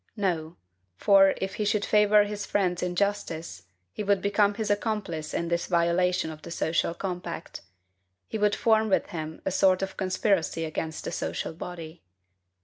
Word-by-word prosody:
No: 170 -5 -1 0.4
for, 195 - +5
if 190 0 -3
he 215 - 0
should 210 0 +1
favor 210 0 +5
his 205 0 -4
friend's 185 -2 0
injustice, 175 - -2 0.2
he 210 - -5
would 200 -1 +2
become 200 +1 +2
his 210 -1 -1
accomplice 205 -7 -2
in 170 - -2
his 170 0 -1
violation 170 0 +1
of 155 -1 -10
the 170 - -9
social 170 0 0
compact; 180 -3 -5 0.7
he 220 - -4
would 205 0 +3
form 220 -1 +3
with 195 - +1
him 160 -1 -6
a 190 - 0
sort 185 0 +3
of 195 - -5
conspiracy 185 -4 0
against 160 0 -4
the - - -4
social - - -3
body. 165 -1 -8
185 Hz, 160 wpm, -27 LUFS, 170-205 Hz, 0.7 s, for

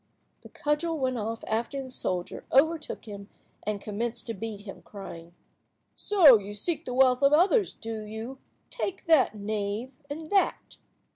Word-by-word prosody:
The - - -13
cudgel 305 +2 -1
went 255 -3 -1
off 225 +1 -4
after 235 +5 -2
the 260 - -10
soldier, 180 -7 -3
overtook 315 +2 +2
him, 200 -2 -9 0.4
and 210 -1 -1
commenced 220 +3 -3
to 230 - -3
beat 215 0 -6
him, 200 -2 -10
crying— 170 -4 -10 0.6
"So 320 - +6
you 205 +1 -8
seek 325 - -2
the 250 - -4
wealth 255 -1 +5
of 280 +1 +5
others, 380 +6 +4
do 225 -1 -5
you? 220 +5 -7 0.3
Take 385 -1 -4
that, 315 -9 +4
knave, 210 +3 -3 0.2
and 310 +2 -6
that." 395 -2 +1
235 Hz, 155 wpm, -28 LUFS, 210-295 Hz, 0.6 s, So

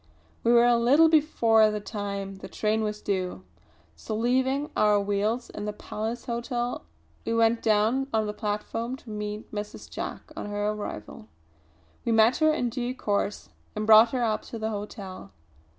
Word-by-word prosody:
We 235 - +3
were 240 0 +6
a 240 -1 +4
little 285 +8 +5
before 230 -9 +4
the 210 0 -2
time 200 -2 -5
the - - -9
train 215 +1 0
was 210 -1 -3
due; 185 - -2 0.5
so 145 - -5
leaving 260 +5 +1
our 210 -1 +4
wheels 205 +4 -1
in 210 - -6
the 210 - -3
Palace 220 +3 -5
Hotel 240 0 -3 0.4
we 230 - -1
went 230 0 +3
down 225 +5 +2
on 220 -1 +1
the 210 - -3
platform 220 +3 -3
to 250 -4 -12
meet 210 0 -5
Mrs. 210 0 -6
Jack - - -6
on - - -5
her 205 0 -1
arrival. 105 - -7 0.8
We 235 - 0
met 225 +2 +5
her 310 -1 +4
in 250 -6 -1
due 245 +1 -3
course, 205 -3 -2 0.3
and 215 - -2
brought 220 +1 +8
her 250 0 -1
up 215 -2 0
to 230 - -7
the 220 0 -2
hotel. 200 - -7
220 Hz, 170 wpm, -27 LUFS, 210-240 Hz, 0.8 s, brought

